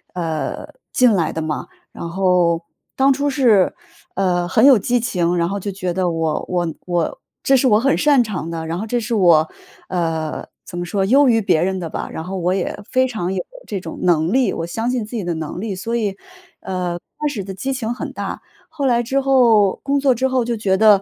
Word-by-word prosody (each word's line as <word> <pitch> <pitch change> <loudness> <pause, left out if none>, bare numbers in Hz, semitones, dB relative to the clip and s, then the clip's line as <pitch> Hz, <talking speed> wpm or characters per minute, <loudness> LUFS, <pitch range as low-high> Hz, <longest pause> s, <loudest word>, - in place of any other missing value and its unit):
呃， 165 - -3 0.2
进 250 -3 +4
来 170 -5 +1
的 160 - -3
嘛。 155 -1 -3 0.2
然 170 - -7
后 180 -2 +2 0.3
当 270 +1 +5
初 285 +2 0
是， 235 -9 +3 0.4
呃， 180 -2 +1
很 225 - +4
有 275 -3 +8
激 245 +4 +1
情， 180 -6 0
然 170 0 +1
后 200 +3 -2
就 200 +1 -4
觉 185 -2 -3
得 185 0 0
我 165 -2 -1
我 175 -1 0 0.2
我 175 -2 -1 0.2
这 270 - +4
是 260 0 +3
我 210 -1 +5
很 275 +4 +2
擅 290 -3 +4
长 205 -8 -3
的， 165 -1 -4
然 165 +1 -3
后 210 - -3
这 240 +2 -1
是 235 +1 -3
我， 170 -6 +4 0.4
呃， 165 -3 -2 0.2
怎 175 - -8
么 175 - -2
说， 195 +2 -1
优 270 +6 +5
于 225 -1 +4
别 160 -6 +2
人 190 +1 -1
的 170 -2 -5
吧， - - -5
然 - - -5
后 190 +3 -5
我 180 0 0
也 190 -2 -2
非 255 0 +3
常 190 -7 -3
有 185 - -1 0.2
这 200 - -4
种 - - -8
能 170 0 +2
力， 260 -1 +3
我 165 - -3
相 225 +8 -2
信 245 -4 -1
自 220 - -8
己 215 - -2
的 175 -1 -2
能 160 +2 -5
力。 215 -2 -3
所 225 +5 -3
以， 205 -4 -1 0.4
呃， 180 -2 -3 0.2
开 300 - -1
始 220 -8 -4
的 195 - -6
激 265 +9 -3
情 240 -3 -2
很 240 - -6
大。 - - -5 0.3
后 315 -3 -3
来 240 -2 +3
之 270 +4 0
后， 235 -7 +4
工 280 +1 0
作 275 -2 +3
之 260 +3 +1
后 260 -1 +1
就 235 -1 -2
觉 195 -3 +1
得。 210 -1 +6
195 Hz, 245 characters per minute, -20 LUFS, 175-245 Hz, 0.4 s, 有